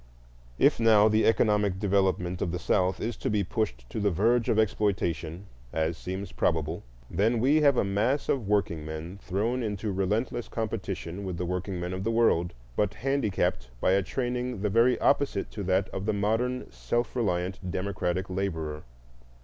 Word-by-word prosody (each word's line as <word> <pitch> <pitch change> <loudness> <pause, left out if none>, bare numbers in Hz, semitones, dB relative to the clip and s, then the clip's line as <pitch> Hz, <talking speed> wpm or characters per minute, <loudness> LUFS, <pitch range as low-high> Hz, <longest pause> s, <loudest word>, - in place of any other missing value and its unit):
If - - +4
now 110 -2 +6
the 110 0 +3
economic 105 -4 +3
development 95 -3 +1
of 85 - 0
the 90 - -2
South 90 +1 +1
is 115 0 -2
to - - -2
be 105 -1 +1
pushed 90 - -3
to - - -3
the 100 -1 +2
verge 115 +6 +2
of 110 - +2
exploitation, 100 -5 0 0.3
as 80 +1 0
seems 95 +3 -5
probable, 80 0 0 0.3
then 110 - +1
we 135 +6 +4
have 140 -3 +5
a - - +3
mass 105 +8 0
of 125 -7 0
workingmen 85 -3 -2
thrown 110 +7 -1
into 105 -1 -2
relentless 105 +5 -1
competition 100 -4 -4
with 95 -3 -4
the 90 - -2
workingmen 90 0 -3
of 95 +1 -4
the 110 - 0
world, 115 -7 +3 0.2
but 105 -2 0
handicapped 110 - 0
by 95 - +2
a 100 +1 +4
training 125 +1 -2
the 105 - +1
very 120 +4 +4
opposite 140 -8 +1
to 105 - -6
that 95 +1 +2
of 95 +2 -5
the 110 - +2
modern 115 +5 0
self 120 +1 -2
reliant 95 -5 -1
democratic 95 0 -2
laborer. 80 -5 -3
100 Hz, 165 wpm, -28 LUFS, 90-115 Hz, 0.3 s, now